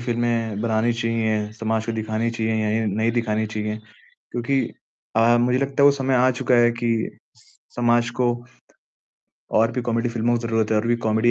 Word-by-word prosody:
फ़िल्में 115 -3 -1
बनानी 115 +1 +1
चाहिए, 110 -2 -1
समाज 110 0 -2
को 115 - -2
दिखानी 110 +1 -2
चाहिए 110 -1 -1 0.3
या 110 - -1
नहीं 110 +3 0
दिखानी 110 -2 0
चाहिए? 105 0 -4 0.5
क्योंकि 125 +3 0 0.6
अ, 115 +1 +5
मुझे 125 +1 +2
लगता 140 +1 0
है, - - +7
वो - - +8
समय 135 -1 -1
आ 130 +1 +4
चुका 125 0 0
है 120 - +4
कि 115 -2 0 0.3
स - - -25 0.3
समाज 120 -1 +2
को 125 - +3 1.3
और 115 +1 +3
भी 125 - -2
कॉमेडी 120 0 0
फ़िल्मों 120 +1 0
की - - -8
ज़रूरत 115 -1 0
है, 110 - +2
और 105 +2 0
भी 120 0 +2
कॉमेडी 110 +2 +3
115 Hz, 185 wpm, -22 LUFS, 110-120 Hz, 1.3 s, वो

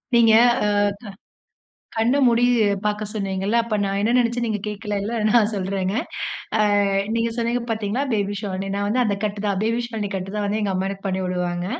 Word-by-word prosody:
நீங்க, 230 -2 +6 0.3
ஆ - - +2
க - - +3 1.2
கண்ண 235 +5 +2
மூடி 235 0 +4 0.4
பார்க்க 210 0 -1
சொன்னீங்கல்ல. 195 +1 -1
அப்ப 230 -2 -3
நான் 195 0 -1
என்ன 215 +3 +1
நினைச்சேன் 240 0 +1
நீங்க 215 -2 -1
கேட்கல 210 0 -3
இல்ல. 215 +4 -3 0.2
நான் 225 -2 +4
சொல்றேங்க. 190 0 -2 0.6
அ - - +3 0.5
நீங்க 230 0 0
சொன்னீங்க 235 +1 0
பார்த்தீங்களா 220 +3 -1
பேபி 205 -1 0
ஷாலினி 195 -2 -4
நான் 205 0 -1
வந்து 250 +4 +2
அந்த 205 - +1
கட்டு 205 -1 -2
தான். 205 - +1
அப்பிடியே 215 +4 0
பேபி 240 - -1
ஷாலினி 220 -3 -4
கட்டு 190 0 -4
தான் 210 - -1
வந்து 210 +2 -1
எங்க 195 -2 0
அம்மா 190 +1 -1
எனக்கு 195 0 -6
பண்ணி 190 0 -1
விடுவாங்க. 180 -1 -2
210 Hz, 195 wpm, -22 LUFS, 195-230 Hz, 1.2 s, நீங்க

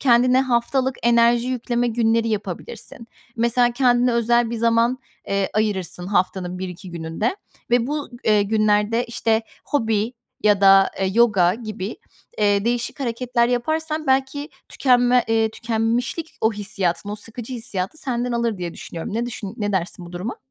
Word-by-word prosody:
kendine 250 0 +4
haftalık 260 +1 0
enerji 235 +1 +4
yükleme 245 -1 -1
günleri 230 0 +1
yapabilirsin. 215 +3 -5 0.3
Mesela 240 +1 +3
kendine 245 -1 +3
özel 235 0 +2
bir 235 - -3
zaman, 230 +2 +2 0.3
eee, 200 -1 0
ayırırsın 190 -4 -1
haftanın 180 -1 -1
1-2 185 0 -7
gününde 170 - -2 0.3
ve 240 0 +3
bu, 295 0 -3 0.2
eee, 210 -1 +4
günlerde, 215 +2 +2
işte, 230 -1 0 0.2
hobi 225 -4 0 0.3
ya 205 -2 +4
da, 195 0 +6
eee, 190 - +2
yoga 200 -7 +4
gibi, 215 -3 -6 0.4
eee, 205 -1 +2
değişik 240 +3 -1
hareketler 240 -1 0
yaparsan 310 +5 -1
belki 270 +3 0 0.2
tükenme, 245 -1 +3
eee, 225 0 +2
tükenmişlik, 230 +8 -2
o 220 - +2
hissiyatın, 200 -2 -2
o 210 - -4
sıkıcı 225 +4 -6
hissiyatı 225 +1 -4
senden 250 -3 -2
alır 235 -3 -1
diye 175 -2 -5
düşünüyorum. 170 +4 -7
Ne 235 +2 -1
düşün 210 -5 -6
ne 205 -1 -2
dersin 180 -1 -3
bu 170 - -12
duruma? 185 +8 -4
230 Hz, 145 wpm, -22 LUFS, 205-245 Hz, 0.4 s, da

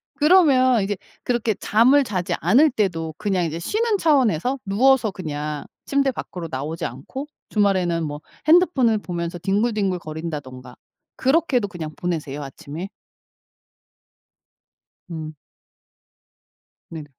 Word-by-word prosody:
그러면 275 - +5
이제 205 +1 -1 0.3
그렇게 235 -3 0
잠을 250 +10 +4
자지 190 -7 -2
않을 300 +5 +5
때도 165 -8 -1
그냥 190 -4 0
이제 165 +1 -3
쉬는 430 - 0
차원에서 260 - +2
누워서 230 +3 +3
그냥 150 -4 -5 0.2
침대 275 -1 +1
밖으로 175 -8 -6
나오지 150 +5 -4
않고 205 - -6 0.2
주말에는 185 -5 +1
뭐 150 -1 -5 0.3
핸드폰을 300 -10 +4
보면서 170 -2 -4
뒹굴뒹굴 200 -1 0
거린다든가 145 -6 -7 0.4
그렇게도 265 -5 +2
그냥 175 -6 -6
보내세요 150 -5 -3
아침에? 160 +7 -8 2.2
음. 155 -2 -6 1.6
네네. 160 -2 -7
195 Hz, 270 characters per minute, -22 LUFS, 160-255 Hz, 2.2 s, 그러면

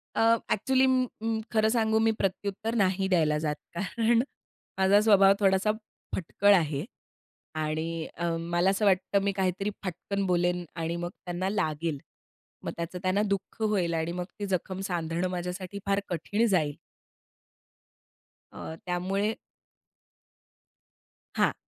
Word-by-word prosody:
अ, - - +2 0.3
actually 260 +5 +3
म, 255 -1 +3 0.2
म, 225 0 0
खरं 220 -1 +3
सांगू, 220 -1 +2
मी 225 0 +4
प्रत्युत्तर 200 +4 -2
नाही 190 -2 +2
द्यायला 155 -5 +3
जात. 150 -1 -1 0.2
कारण 230 +6 +2 0.6
माझा 190 +1 +5
स्वभाव 200 -2 +6
थोडासा 195 +1 +3 0.4
फटकळ 200 +3 +3
आहे. 155 -3 0 0.7
आणि 160 +1 -2
अं, 170 0 -1
मला 175 +2 +3
असं 195 +2 +1
वाटतं, 190 +1 +3
मी 200 - +2
काहीतरी 190 +1 0
फटकन 195 +2 -3
बोलेन 175 -1 +1
आणि 165 0 -2
मग 175 0 -3 0.2
त्यांना 180 +1 -2
लागेल. 160 -5 -1 0.7
मग - - -3
त्याचं 170 +2 -4
त्यांना 185 +2 +2
दुःख 200 +2 -3
होईल 200 -6 +1
आणि 165 +1 -1
मग 180 0 -3
ती 205 - -2
जखम 185 0 -2
सांधणं 170 0 -1
माझ्यासाठी 180 +2 -4
फार 200 0 +2
कठीण 195 +6 0
जाईल. 155 -8 +1 1.8
अ, 160 - -7
त्यामुळे 190 +4 0 2.0
हां. - - +3
185 Hz, 130 wpm, -28 LUFS, 170-205 Hz, 2.0 s, स्वभाव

